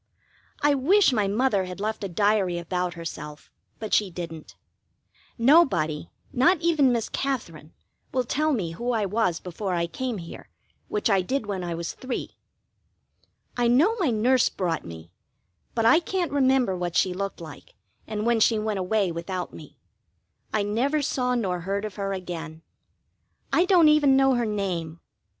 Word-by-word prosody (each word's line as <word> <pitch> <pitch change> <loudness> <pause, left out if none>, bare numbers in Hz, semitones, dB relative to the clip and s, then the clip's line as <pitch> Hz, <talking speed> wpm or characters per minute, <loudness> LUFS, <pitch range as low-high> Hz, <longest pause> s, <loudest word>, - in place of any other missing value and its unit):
I 295 0 +5
wish 315 +5 +4
my 210 -4 +1
Mother 205 -2 +1
had 180 +1 -8
left 215 +1 -3
a 200 - -3
diary 200 -1 +1
about 180 +1 -2
herself, 155 -3 -8 0.3
but 215 -2 -6
she 205 -2 +3
didn't. 165 -3 -8 0.8
Nobody, 230 - +3 0.2
not 330 +8 +4
even 315 -6 +3
Miss 235 -2 0
Katherine, 170 - -4 0.4
will 255 - 0
tell 305 +6 0
me 190 - -1
who 240 +9 -2
I 220 -3 +1
was 190 -4 0
before 185 +1 -4
I 170 0 0
came 255 +4 -4
here, 170 -2 -10 0.4
which 420 -8 -1
I 195 -4 +3
did 245 +6 -2
when 195 -3 -3
I 170 -1 -3
was 170 0 -4
three. 255 -1 -5 1.2
I 245 -1 +1
know 300 - +4
my 335 -8 +2
nurse 240 +3 +3
brought 170 -4 -2
me, 80 0 -10 0.6
but 230 -1 +1
I 315 +8 +6
can't 350 -1 -2
remember 265 -7 +2
what 175 -1 -4
she 185 - +2
looked 195 +1 -4
like, 160 -3 -11 0.3
and 215 0 -3
when 235 -1 +2
she 220 +1 +4
went 215 -2 -2
away 190 0 0
without 175 +2 -5
me: - - -12 0.7
I 210 - +1
never 265 +9 0
saw 250 -3 0
nor 190 -7 -1
heard 200 +4 -3
of 210 -3 -7
her 195 -1 -2
again. 165 -4 -6 0.9
I 350 - +4
don't 360 -4 +5
even 295 -3 +5
know 270 0 +4
her 240 -2 0
name. 175 -6 -3
210 Hz, 165 wpm, -25 LUFS, 180-260 Hz, 1.2 s, I